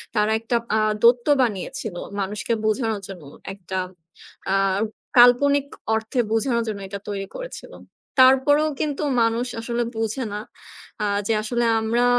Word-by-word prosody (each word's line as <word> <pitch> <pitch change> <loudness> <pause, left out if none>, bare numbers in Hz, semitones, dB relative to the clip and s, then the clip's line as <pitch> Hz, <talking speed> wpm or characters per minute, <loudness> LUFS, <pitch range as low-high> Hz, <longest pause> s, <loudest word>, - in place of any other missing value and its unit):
তারা 210 0 +2
একটা 230 +2 -2 0.2
আ - - +3 0.2
দৈত্য 240 +2 +5
বানিয়েছিল 220 -1 -2 0.2
মানুষকে 200 +3 -2
বোঝানোর 220 -1 0
জন্য। 185 -5 -10 0.3
একটা 190 -1 -6 0.8
আ - - +3 0.6
কাল্পনিক 275 +4 +6 0.3
অর্থে 220 +3 -2
বোঝানোর 235 +1 +1
জন্য 210 -2 -3
এটা 200 +1 -6
তৈরি 195 -1 -4
করেছিল। - - -8 0.5
তারপরও 265 +4 +5
কিন্তু 295 0 -2 0.2
মানুষ 230 +2 +1
আসলে 235 +1 -1
বোঝে 225 +3 -2
না, 205 - -3 0.6
আ - - +1 0.2
যে 225 - +2
আসলে 240 +2 0 0.2
আমরা 235 +2 +1
230 Hz, 135 wpm, -23 LUFS, 210-255 Hz, 0.8 s, কাল্পনিক